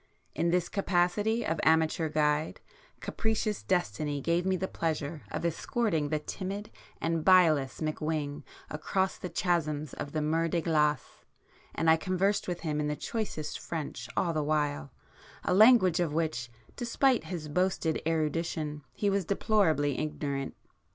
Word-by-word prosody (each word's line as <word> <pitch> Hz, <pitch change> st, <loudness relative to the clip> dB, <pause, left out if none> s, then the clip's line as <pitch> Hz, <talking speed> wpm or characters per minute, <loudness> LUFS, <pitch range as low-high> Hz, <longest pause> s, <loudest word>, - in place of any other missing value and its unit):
In 170 Hz, -, 0 dB
this 175 Hz, 0 st, +1 dB
capacity 200 Hz, +4 st, +1 dB
of 160 Hz, -, -1 dB
amateur 160 Hz, 0 st, +3 dB
guide, 150 Hz, 0 st, +1 dB, 0.4 s
capricious 220 Hz, -2 st, -1 dB
destiny 145 Hz, -, -1 dB
gave 170 Hz, +5 st, 0 dB
me 190 Hz, -, +2 dB
the 190 Hz, +1 st, -2 dB
pleasure 155 Hz, -3 st, -3 dB
of -, -, -3 dB
escorting 170 Hz, -2 st, 0 dB
the 155 Hz, -, +1 dB
timid 195 Hz, +6 st, -5 dB, 0.3 s
and 165 Hz, -1 st, -1 dB
bilious 160 Hz, -8 st, +4 dB
McWhing 155 Hz, -1 st, -2 dB, 0.3 s
across 190 Hz, +5 st, -1 dB
the 180 Hz, -, -5 dB
chasms 155 Hz, -5 st, -1 dB
of 140 Hz, -, -5 dB
the 155 Hz, -, -1 dB
Mer 165 Hz, +2 st, +1 dB
de 170 Hz, +1 st, 0 dB
Glace, 150 Hz, -2 st, 0 dB, 0.5 s
and 165 Hz, -, 0 dB
I 160 Hz, 0 st, +7 dB
conversed 185 Hz, +4 st, 0 dB
with 175 Hz, -1 st, -3 dB
him 150 Hz, -2 st, -1 dB
in 150 Hz, -, 0 dB
the 150 Hz, -, -1 dB
choicest 205 Hz, -6 st, -4 dB
French 145 Hz, -7 st, -5 dB
all 170 Hz, -2 st, +1 dB
the 155 Hz, -, 0 dB
while, 150 Hz, -1 st, -1 dB, 0.5 s
a -, -, +1 dB
language 205 Hz, -4 st, +6 dB
of 165 Hz, -4 st, 0 dB
which, 155 Hz, -8 st, -1 dB, 0.3 s
despite 245 Hz, +1 st, +1 dB
his 170 Hz, -5 st, -5 dB
boasted 165 Hz, 0 st, 0 dB
erudition, 155 Hz, -1 st, -1 dB
he 205 Hz, -, -1 dB
was 200 Hz, -1 st, +2 dB
deplorably 165 Hz, -8 st, +2 dB
ignorant. 140 Hz, -3 st, -3 dB
160 Hz, 145 wpm, -30 LUFS, 150-185 Hz, 0.5 s, I